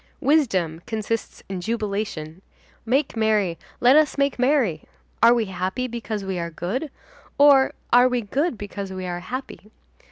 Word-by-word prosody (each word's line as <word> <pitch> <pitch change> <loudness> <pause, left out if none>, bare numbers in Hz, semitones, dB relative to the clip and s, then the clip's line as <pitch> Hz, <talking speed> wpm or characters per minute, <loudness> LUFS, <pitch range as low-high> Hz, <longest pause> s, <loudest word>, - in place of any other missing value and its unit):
Wisdom 220 - +1
consists 220 0 -3
in 190 -2 -5
jubilation. 200 -6 -3 0.5
Make 270 +3 +1
merry, 215 -6 +1 0.2
let 250 +3 +6
us 305 -1 +3
make 280 -2 +1
merry. 250 - +1 0.4
Are 235 +1 +7
we 230 -2 +1
happy 190 +5 -3
because 225 -4 -4
we 190 -2 -3
are 170 0 -3
good, 190 - -4 0.5
or 280 -2 +6 0.2
are 245 +1 +7
we 250 -1 0
good 265 - -1
because 200 -1 -6
we 185 -1 -5
are 175 -1 -3
happy? 250 0 -7
220 Hz, 150 wpm, -23 LUFS, 190-255 Hz, 0.5 s, Are